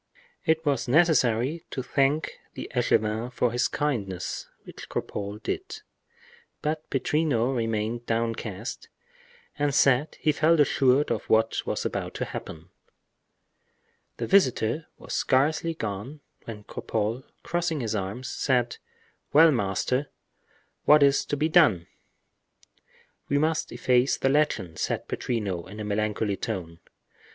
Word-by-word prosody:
It 160 Hz, 0 st, +2 dB
was 140 Hz, -5 st, 0 dB
necessary 145 Hz, -1 st, +3 dB
to 130 Hz, -, -4 dB
thank 140 Hz, +4 st, 0 dB, 0.2 s
the -, -, -7 dB
echevin 110 Hz, +3 st, +1 dB
for 125 Hz, -1 st, +1 dB
his 120 Hz, +1 st, +1 dB
kindness, 100 Hz, -12 st, -3 dB, 0.2 s
which -, -, -11 dB
Cropole 100 Hz, 0 st, -4 dB
did. 410 Hz, +3 st, -4 dB, 0.8 s
But 155 Hz, +1 st, -2 dB
Pittrino 135 Hz, -3 st, +1 dB
remained 115 Hz, 0 st, -2 dB
downcast 115 Hz, -1 st, -3 dB, 0.7 s
and 145 Hz, -1 st, +1 dB
said 140 Hz, +1 st, +3 dB
he 155 Hz, -, +3 dB
felt 160 Hz, +2 st, +3 dB
assured 140 Hz, -1 st, +3 dB
of -, -, -2 dB
what 110 Hz, 0 st, +3 dB
was -, -, -2 dB
about -, -, -3 dB
to -, -, -2 dB
happen. 80 Hz, +1 st, -8 dB, 1.5 s
The -, -, -2 dB
visitor 150 Hz, -, +2 dB
was -, -, -8 dB
scarcely 155 Hz, +5 st, +1 dB
gone 110 Hz, +6 st, -5 dB, 0.2 s
when 105 Hz, -2 st, -8 dB
Cropole, 110 Hz, +4 st, -3 dB, 0.2 s
crossing 170 Hz, -4 st, -1 dB
his 110 Hz, -2 st, -2 dB
arms, 105 Hz, +5 st, -3 dB
said: 125 Hz, -3 st, 0 dB, 0.6 s
"Well, 160 Hz, +2 st, +8 dB
master, 125 Hz, +4 st, 0 dB, 0.8 s
what 150 Hz, -1 st, +7 dB
is 140 Hz, 0 st, +4 dB
to 145 Hz, -, -2 dB
be 150 Hz, +3 st, +2 dB
done?" 150 Hz, -, +4 dB, 1.4 s
"We 140 Hz, -, +2 dB
must 155 Hz, +2 st, 0 dB
efface 125 Hz, +1 st, +2 dB
the 135 Hz, -, +1 dB
legend," 125 Hz, -, 0 dB
said -, -, -2 dB
Pittrino, 100 Hz, -7 st, -3 dB
in 105 Hz, +2 st, -9 dB
a -, -, -3 dB
melancholy 105 Hz, -1 st, -1 dB
tone. 90 Hz, -8 st, -5 dB
125 Hz, 125 wpm, -26 LUFS, 110-150 Hz, 1.5 s, Well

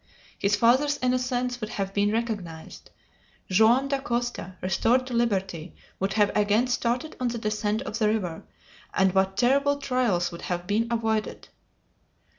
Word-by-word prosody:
His 200 Hz, +1 st, +2 dB
father's 260 Hz, +7 st, +3 dB
innocence 250 Hz, -1 st, 0 dB
would 215 Hz, -, -4 dB
have 195 Hz, -2 st, -3 dB
been 205 Hz, +1 st, +2 dB
recognized! 205 Hz, -8 st, -4 dB, 0.6 s
Joam 225 Hz, +7 st, +4 dB
Dacosta, 240 Hz, -7 st, -2 dB
restored 230 Hz, +8 st, +1 dB
to 255 Hz, -, -6 dB
liberty, 190 Hz, -8 st, -1 dB, 0.2 s
would 195 Hz, +1 st, -1 dB
have 205 Hz, -2 st, +2 dB
again 210 Hz, +3 st, +3 dB
started 250 Hz, +4 st, -1 dB
on 250 Hz, -, 0 dB
the 235 Hz, 0 st, -2 dB
descent 215 Hz, +1 st, -1 dB
of 230 Hz, -4 st, -5 dB
the 215 Hz, -, +3 dB
river, 190 Hz, -7 st, -2 dB, 0.5 s
and 190 Hz, -1 st, +3 dB
what 190 Hz, 0 st, +1 dB
terrible 280 Hz, +5 st, +3 dB
trials 250 Hz, -10 st, 0 dB
would 170 Hz, -, -9 dB
have 175 Hz, -1 st, -3 dB
been 215 Hz, +4 st, 0 dB
avoided! 225 Hz, -2 st, -2 dB
220 Hz, 145 wpm, -26 LUFS, 195-245 Hz, 0.6 s, Joam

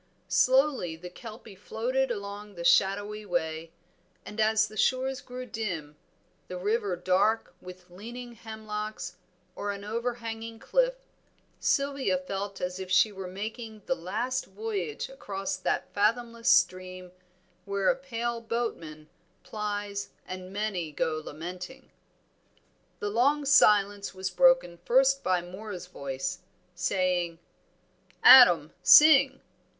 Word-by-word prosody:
Slowly 260 Hz, -, +2 dB
the 175 Hz, +2 st, -10 dB
Kelpie 225 Hz, +1 st, -11 dB
floated 250 Hz, +7 st, -2 dB
along 205 Hz, -2 st, -6 dB
the 170 Hz, -, -6 dB
shadowy 205 Hz, +4 st, +2 dB
way, 165 Hz, -3 st, -3 dB, 0.5 s
and 210 Hz, +2 st, -9 dB
as 220 Hz, 0 st, +3 dB
the 215 Hz, -, -13 dB
shores 260 Hz, +4 st, 0 dB
grew 250 Hz, 0 st, -8 dB
dim, 180 Hz, -11 st, -5 dB, 0.5 s
the 180 Hz, -, -6 dB
river 205 Hz, 0 st, -1 dB
dark 185 Hz, +5 st, +1 dB
with 180 Hz, 0 st, -12 dB
leaning 240 Hz, +6 st, -9 dB
hemlocks 215 Hz, -3 st, -6 dB, 0.4 s
or 205 Hz, -, -4 dB
an 200 Hz, 0 st, -7 dB
overhanging 230 Hz, 0 st, -4 dB
cliff, -, -, +1 dB, 0.6 s
Sylvia 275 Hz, -1 st, +1 dB
felt 200 Hz, -7 st, -5 dB
as 180 Hz, +1 st, -4 dB
if 190 Hz, -1 st, -6 dB
she 185 Hz, +3 st, +4 dB
were 190 Hz, -2 st, -7 dB
making 220 Hz, +3 st, -7 dB
the -, -, +1 dB
last 245 Hz, +6 st, -3 dB
voyage 195 Hz, -6 st, -4 dB
across 195 Hz, -7 st, -5 dB
that 185 Hz, -, -2 dB
fathomless 230 Hz, +3 st, 0 dB
stream 185 Hz, 0 st, +1 dB, 0.5 s
where 200 Hz, -1 st, -1 dB
a -, -, +3 dB
pale 240 Hz, -3 st, -4 dB
boatman 170 Hz, -10 st, -4 dB, 0.4 s
plies 205 Hz, -1 st, -4 dB, 0.2 s
and 185 Hz, 0 st, -8 dB
many 195 Hz, -6 st, -3 dB
go 155 Hz, +1 st, -2 dB
lamenting. 180 Hz, -, -8 dB, 1.1 s
The 205 Hz, -, -3 dB
long 280 Hz, +6 st, +2 dB
silence 205 Hz, -7 st, +4 dB
was 190 Hz, 0 st, -3 dB
broken 260 Hz, -7 st, +3 dB
first 270 Hz, +4 st, +3 dB
by 185 Hz, -1 st, +1 dB
Moor's 185 Hz, +1 st, -8 dB
voice, 180 Hz, +2 st, -5 dB, 0.3 s
saying 180 Hz, -2 st, 0 dB, 0.9 s
"Adam, 175 Hz, -, +8 dB
sing." 275 Hz, -3 st, +7 dB
205 Hz, 120 wpm, -28 LUFS, 185-235 Hz, 1.1 s, Adam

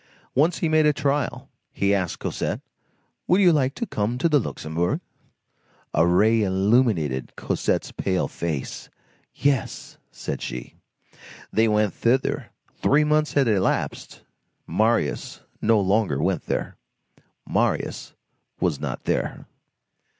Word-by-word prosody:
Once 160 Hz, +6 st, +3 dB
he 165 Hz, -, 0 dB
made 155 Hz, -1 st, +4 dB
a 150 Hz, -, +4 dB
trial. 145 Hz, 0 st, -1 dB, 0.2 s
He 100 Hz, 0 st, +1 dB
asked 95 Hz, -4 st, -1 dB
Cosette:— -, -, -3 dB, 0.7 s
"Would 180 Hz, -, +4 dB
you 180 Hz, -4 st, +6 dB
like 135 Hz, -2 st, +1 dB
to 235 Hz, -, -2 dB
come 110 Hz, -, -2 dB
to 145 Hz, -, +2 dB
the 150 Hz, -3 st, +4 dB
Luxembourg?" 85 Hz, -6 st, -2 dB, 0.9 s
A 80 Hz, +2 st, +4 dB
ray 110 Hz, +6 st, +4 dB
illuminated 95 Hz, -, +1 dB
Cosette's -, -, -1 dB
pale 95 Hz, -2 st, -1 dB
face. 80 Hz, -5 st, -4 dB, 0.5 s
"Yes," 140 Hz, -4 st, -1 dB
said -, -, -5 dB
she. -, -, -6 dB, 0.8 s
They 110 Hz, +2 st, +4 dB
went 105 Hz, -1 st, +2 dB
thither. 130 Hz, +3 st, 0 dB, 0.3 s
Three 150 Hz, +2 st, +4 dB
months 150 Hz, 0 st, +2 dB
had 140 Hz, -3 st, +3 dB
elapsed. 100 Hz, -4 st, -1 dB, 0.4 s
Marius 110 Hz, -7 st, 0 dB, 0.2 s
no 110 Hz, -1 st, +4 dB
longer 95 Hz, -7 st, +1 dB
went 90 Hz, +2 st, -1 dB
there. -, -, -2 dB, 0.7 s
Marius -, -, -1 dB, 0.4 s
was -, -, 0 dB
not -, -, -4 dB
there. -, -, -2 dB
110 Hz, 120 wpm, -24 LUFS, 95-140 Hz, 0.9 s, you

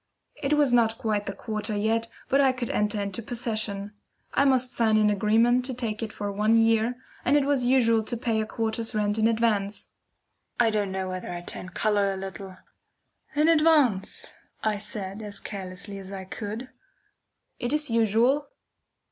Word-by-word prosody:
It 280 Hz, 0 st, +1 dB
was 290 Hz, -4 st, +3 dB
not 225 Hz, -2 st, +3 dB
quite 210 Hz, -2 st, -1 dB
the 200 Hz, -, -2 dB
quarter 215 Hz, +1 st, -3 dB
yet, 225 Hz, +2 st, +1 dB, 0.2 s
but 275 Hz, +1 st, +3 dB
I 265 Hz, -2 st, +4 dB
could 250 Hz, -2 st, -3 dB
enter 210 Hz, 0 st, 0 dB
into 200 Hz, +2 st, -3 dB
possession. 215 Hz, -3 st, -3 dB, 0.4 s
I 280 Hz, -, +3 dB
must 255 Hz, -2 st, +2 dB
sign 220 Hz, -2 st, +3 dB
an 210 Hz, -1 st, +4 dB
agreement 225 Hz, +5 st, +3 dB
to 260 Hz, -1 st, -3 dB
take 225 Hz, -3 st, -3 dB
it 220 Hz, -1 st, -3 dB
for 205 Hz, -1 st, -4 dB
one 210 Hz, +3 st, +2 dB
year, 225 Hz, +1 st, +3 dB, 0.3 s
and 280 Hz, +4 st, +4 dB
it 285 Hz, -, +2 dB
was 275 Hz, -3 st, +2 dB
usual 235 Hz, -3 st, +4 dB
to 240 Hz, -, -2 dB
pay 225 Hz, -2 st, 0 dB
a 215 Hz, -, -3 dB
quarter's 225 Hz, 0 st, -2 dB
rent 210 Hz, 0 st, +1 dB
in 220 Hz, -, +4 dB
advance. 220 Hz, -3 st, 0 dB, 0.7 s
I 230 Hz, -2 st, +4 dB
don't 205 Hz, -2 st, 0 dB
know 190 Hz, 0 st, -2 dB
whether 185 Hz, -1 st, -5 dB
I 175 Hz, 0 st, -5 dB
turned 180 Hz, +1 st, -9 dB
colour 205 Hz, -2 st, +2 dB
a -, -, -5 dB
little. 190 Hz, 0 st, -7 dB, 0.8 s
"In 300 Hz, +2 st, +3 dB
advance!" 300 Hz, -11 st, +3 dB, 0.3 s
I 215 Hz, -2 st, 0 dB
said, 200 Hz, -1 st, -5 dB
as 205 Hz, -2 st, -7 dB
carelessly 195 Hz, 0 st, -6 dB
as 190 Hz, 0 st, -10 dB
I 195 Hz, -1 st, -6 dB
could. 215 Hz, +6 st, -6 dB, 0.9 s
"It 240 Hz, -, -2 dB
is 300 Hz, -3 st, 0 dB
usual." 230 Hz, +6 st, +3 dB
220 Hz, 175 wpm, -26 LUFS, 205-240 Hz, 0.9 s, I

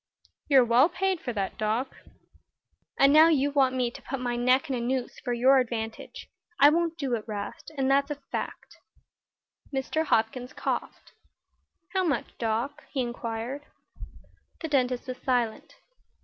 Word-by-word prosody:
"You're 265 Hz, -3 st, +6 dB
well 245 Hz, +7 st, +5 dB
paid 380 Hz, -2 st, -1 dB
for 245 Hz, -, -3 dB
that, 195 Hz, -3 st, -3 dB
Doc." 220 Hz, +5 st, -1 dB, 1.0 s
"And 275 Hz, +1 st, +5 dB
now 310 Hz, +2 st, +8 dB
you 285 Hz, -3 st, +2 dB
want 265 Hz, -2 st, +3 dB
me 250 Hz, -2 st, 0 dB
to -, -, -11 dB
put 270 Hz, -, -5 dB
my 245 Hz, -1 st, -2 dB
neck 250 Hz, +2 st, +2 dB
in 270 Hz, -, -1 dB
a -, -, -2 dB
noose 250 Hz, +1 st, -2 dB
for 245 Hz, -, -4 dB
your 260 Hz, +3 st, +5 dB
advantage. 225 Hz, -3 st, -4 dB, 0.3 s
I 285 Hz, +2 st, +8 dB
won't 335 Hz, 0 st, 0 dB
do 275 Hz, -6 st, -2 dB
it, 225 Hz, -3 st, -1 dB
'Rast, 210 Hz, +7 st, -6 dB
and 270 Hz, 0 st, +1 dB
that's 280 Hz, +1 st, +3 dB
a 295 Hz, -, -2 dB
fact." 280 Hz, -1 st, -7 dB, 0.9 s
Mr. 280 Hz, +4 st, -1 dB
Hopkins 245 Hz, 0 st, 0 dB
coughed. -, -, -4 dB, 0.8 s
"How 380 Hz, -1 st, +2 dB
much, 290 Hz, -8 st, -1 dB
Doc?" 240 Hz, +6 st, -2 dB
he 270 Hz, -, -1 dB
inquired. 240 Hz, +3 st, -4 dB, 0.9 s
The 325 Hz, -, -2 dB
dentist 255 Hz, -3 st, 0 dB
was 255 Hz, 0 st, -5 dB
silent. 240 Hz, -4 st, -1 dB
260 Hz, 155 wpm, -27 LUFS, 240-285 Hz, 1.0 s, now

